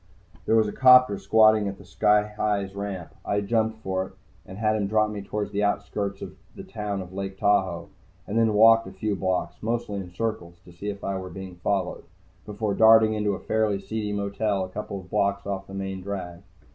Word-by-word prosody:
There 110 Hz, -, +3 dB
was 110 Hz, -1 st, +4 dB
a -, -, -3 dB
'copter 125 Hz, -5 st, +6 dB
squatting 110 Hz, +1 st, +4 dB
at 100 Hz, 0 st, -5 dB
the 100 Hz, -, -15 dB
Sky 105 Hz, +3 st, +2 dB
Hi's 100 Hz, -2 st, -1 dB
ramp. 100 Hz, -3 st, -6 dB
I 100 Hz, -, 0 dB
jumped 110 Hz, +1 st, -1 dB
for 95 Hz, 0 st, -2 dB
it -, -, -18 dB, 0.3 s
and 95 Hz, -, -9 dB
had 110 Hz, 0 st, +1 dB
him 105 Hz, -2 st, -1 dB
drop 110 Hz, +1 st, +2 dB
me 105 Hz, -1 st, -5 dB
toward 105 Hz, +1 st, -4 dB
the 105 Hz, 0 st, -1 dB
outskirts 100 Hz, -1 st, -2 dB
of -, -, -9 dB, 0.2 s
the -, -, -8 dB
town 105 Hz, -3 st, -4 dB
of 90 Hz, 0 st, -13 dB
Lake 95 Hz, 0 st, -5 dB
Tahoe, 95 Hz, -5 st, +1 dB, 0.4 s
and 105 Hz, -, -5 dB
then 115 Hz, -2 st, +3 dB
walked 115 Hz, 0 st, +6 dB
a -, -, -8 dB
few 100 Hz, +2 st, -2 dB
blocks, 95 Hz, 0 st, -2 dB
mostly 115 Hz, -2 st, -2 dB
in 90 Hz, -2 st, -7 dB
circles 90 Hz, -3 st, -4 dB
to 90 Hz, -, -14 dB
see 95 Hz, +4 st, -6 dB
if 100 Hz, -1 st, -7 dB
I 95 Hz, -1 st, -2 dB
were 95 Hz, 0 st, -7 dB
being 95 Hz, 0 st, -9 dB
followed, 95 Hz, 0 st, -2 dB, 0.4 s
before 105 Hz, 0 st, -2 dB
darting 110 Hz, 0 st, +6 dB
into 105 Hz, -2 st, 0 dB
a -, -, -8 dB
fairly 110 Hz, -2 st, 0 dB
seedy 105 Hz, +1 st, -4 dB
motel 100 Hz, -1 st, -1 dB
a -, -, -11 dB
couple 100 Hz, 0 st, -6 dB
blocks 100 Hz, +1 st, -1 dB
off 95 Hz, -1 st, -4 dB
the 95 Hz, -, -9 dB
main 95 Hz, -1 st, -4 dB
drag. 90 Hz, -3 st, -6 dB
100 Hz, 210 wpm, -25 LUFS, 95-110 Hz, 0.4 s, copter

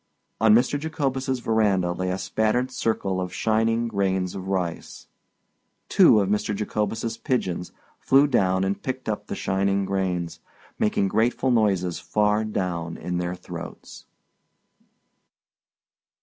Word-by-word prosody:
On 110 Hz, -1 st, +6 dB
Mr. 130 Hz, +4 st, +2 dB
Jacobus's 135 Hz, -4 st, -2 dB
veranda 105 Hz, -6 st, +2 dB
lay 90 Hz, +1 st, -2 dB
a 90 Hz, -, -1 dB
spattered 110 Hz, +6 st, 0 dB
circle 100 Hz, -6 st, -1 dB
of 90 Hz, -1 st, -4 dB
shining 115 Hz, +1 st, +1 dB
grains 95 Hz, -4 st, 0 dB
of 95 Hz, -1 st, -6 dB
rice. 90 Hz, -3 st, -3 dB, 0.8 s
Two 105 Hz, -, +6 dB
of 100 Hz, -, 0 dB
Mr. 105 Hz, +1 st, 0 dB
Jacobus's 110 Hz, +2 st, -2 dB
pigeons 90 Hz, -9 st, -2 dB, 0.3 s
flew 135 Hz, +2 st, +5 dB
down 95 Hz, -9 st, +2 dB
and 95 Hz, +1 st, -1 dB
picked 130 Hz, 0 st, -4 dB
up 105 Hz, -1 st, -3 dB
the -, -, -4 dB
shining 100 Hz, +1 st, 0 dB
grains, 90 Hz, -4 st, -2 dB, 0.4 s
making 105 Hz, -2 st, +2 dB
grateful 120 Hz, +5 st, +1 dB
noises 95 Hz, -7 st, +1 dB
far 105 Hz, 0 st, +1 dB
down 90 Hz, -6 st, -3 dB
in 90 Hz, 0 st, -3 dB
their 90 Hz, 0 st, -2 dB
throats. -, -, -9 dB
105 Hz, 125 wpm, -24 LUFS, 95-115 Hz, 0.8 s, On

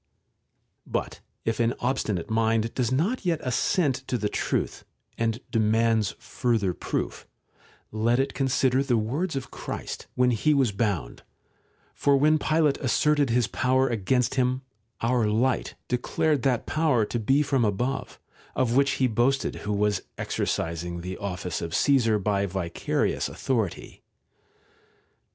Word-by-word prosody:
§ -, -, -49 dB, 0.8 s
10. -, -, -18 dB
But -, -, -2 dB, 0.3 s
if 115 Hz, 0 st, -1 dB
an 120 Hz, 0 st, +2 dB
obstinate 115 Hz, -8 st, -1 dB
mind 115 Hz, 0 st, +1 dB
does 125 Hz, -2 st, 0 dB
not 180 Hz, -, 0 dB
yet 170 Hz, -4 st, +1 dB
assent 140 Hz, +2 st, +1 dB
to 125 Hz, -, 0 dB
the 105 Hz, -2 st, -1 dB
truth, -, -, -2 dB, 0.3 s
and 115 Hz, 0 st, -1 dB
demands 110 Hz, -2 st, +2 dB
further 110 Hz, -7 st, -1 dB
proof, -, -, -4 dB, 0.6 s
let 115 Hz, +3 st, +1 dB
it 135 Hz, +1 st, 0 dB
consider 130 Hz, -1 st, +2 dB
the 130 Hz, -4 st, +1 dB
words 140 Hz, +11 st, -1 dB
of 135 Hz, -2 st, -4 dB
Christ -, -, -6 dB
when 125 Hz, 0 st, +3 dB
He 150 Hz, +6 st, +2 dB
was 135 Hz, -6 st, +3 dB
bound; 100 Hz, -3 st, -2 dB, 0.7 s
for 140 Hz, -1 st, +3 dB
when 155 Hz, +3 st, +4 dB
Pilate 155 Hz, -2 st, +2 dB
asserted 145 Hz, +2 st, +2 dB
his 120 Hz, 0 st, +3 dB
power 130 Hz, +4 st, +1 dB
against 120 Hz, +3 st, +1 dB
Him, 130 Hz, 0 st, 0 dB, 0.4 s
our 115 Hz, -1 st, +2 dB
Light 120 Hz, +5 st, 0 dB
declared 135 Hz, +3 st, 0 dB
that 125 Hz, -2 st, +1 dB
power 150 Hz, -8 st, +2 dB
to 120 Hz, -, -3 dB
be 135 Hz, +7 st, +3 dB
from 135 Hz, -3 st, +1 dB
above, 120 Hz, +6 st, -2 dB, 0.4 s
of 125 Hz, -2 st, +1 dB
which 140 Hz, +1 st, +4 dB
he 130 Hz, -, +1 dB
boasted 125 Hz, +4 st, +1 dB
who 105 Hz, -, -4 dB
was 105 Hz, -1 st, +1 dB, 0.2 s
exercising 85 Hz, +1 st, -2 dB
the 90 Hz, +1 st, -5 dB
office 90 Hz, -3 st, -4 dB
of 85 Hz, -1 st, -3 dB
Caesar 120 Hz, -6 st, +3 dB
by 100 Hz, 0 st, 0 dB
vicarious 90 Hz, -3 st, -1 dB
authority. 115 Hz, -9 st, -3 dB
120 Hz, 140 wpm, -26 LUFS, 105-135 Hz, 0.8 s, when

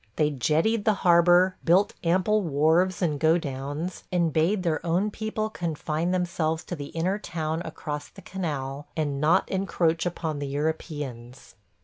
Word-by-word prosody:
They 150 Hz, -1 st, +2 dB
jettied 160 Hz, -, +1 dB
the 215 Hz, -1 st, +3 dB
harbor, 175 Hz, +2 st, +5 dB
built 180 Hz, +4 st, +3 dB
ample 185 Hz, +5 st, +2 dB
wharves 165 Hz, +4 st, +2 dB
and 150 Hz, -4 st, 0 dB
go 160 Hz, +2 st, +4 dB
downs, 145 Hz, +4 st, -5 dB
and 170 Hz, -4 st, +1 dB
bade 180 Hz, +5 st, +2 dB
their 165 Hz, -3 st, 0 dB
own 180 Hz, +5 st, +1 dB
people 215 Hz, 0 st, -3 dB
confine 165 Hz, -2 st, -2 dB
themselves 170 Hz, -3 st, -1 dB
to 175 Hz, -, -5 dB
the 145 Hz, -3 st, -6 dB
inner 185 Hz, +5 st, 0 dB
town 160 Hz, -4 st, -3 dB
across 150 Hz, -2 st, -6 dB
the -, -, -15 dB
canal, 145 Hz, -6 st, -4 dB
and 145 Hz, -3 st, -1 dB
not 165 Hz, +5 st, +3 dB
encroach 175 Hz, -3 st, 0 dB
upon 160 Hz, -3 st, -3 dB
the 145 Hz, -, -3 dB
Europeans. 140 Hz, -4 st, -4 dB
165 Hz, 150 wpm, -26 LUFS, 150-180 Hz, -, harbor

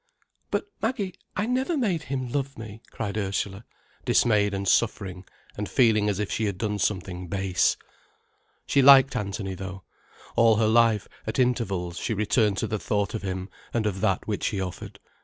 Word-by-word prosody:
"But, -, -, -1 dB, 0.2 s
Maggie, 215 Hz, -5 st, -1 dB, 0.2 s
I 205 Hz, -, +1 dB
never 260 Hz, +7 st, 0 dB
made 195 Hz, -, 0 dB
him 130 Hz, -4 st, -4 dB
love 135 Hz, 0 st, -2 dB
me," 110 Hz, -1 st, -9 dB
cried 110 Hz, -1 st, -3 dB
Ursula, 100 Hz, +1 st, -3 dB, 0.4 s
dismayed 105 Hz, -3 st, +3 dB
and 100 Hz, 0 st, -3 dB
suffering, 95 Hz, -4 st, 0 dB, 0.3 s
and 105 Hz, 0 st, -4 dB
feeling 110 Hz, -5 st, +3 dB
as 100 Hz, -, -1 dB
if 105 Hz, -1 st, -2 dB
she 110 Hz, -, 0 dB
had 100 Hz, -3 st, -2 dB
done 105 Hz, 0 st, -2 dB
something 90 Hz, -3 st, -2 dB
base. 95 Hz, 0 st, +1 dB, 0.9 s
She 140 Hz, -, +3 dB
liked 135 Hz, -1 st, +8 dB
Anthony, 100 Hz, -3 st, -3 dB
though. 95 Hz, 0 st, -7 dB, 0.5 s
All 115 Hz, -1 st, +5 dB
her 110 Hz, +1 st, +2 dB
life, 110 Hz, -1 st, +3 dB, 0.2 s
at 110 Hz, -, -2 dB
intervals, 100 Hz, -9 st, 0 dB
she 110 Hz, -, -2 dB
returned 105 Hz, 0 st, +2 dB
to -, -, -1 dB
the 110 Hz, -, -2 dB
thought 105 Hz, 0 st, -1 dB
of 110 Hz, -, -3 dB
him 95 Hz, 0 st, -4 dB, 0.3 s
and 115 Hz, -2 st, +1 dB
of 95 Hz, -3 st, -2 dB
that 95 Hz, -3 st, 0 dB
which 105 Hz, -2 st, -1 dB
he 100 Hz, -, -2 dB
offered. 90 Hz, -2 st, -6 dB
105 Hz, 175 wpm, -26 LUFS, 95-120 Hz, 0.9 s, liked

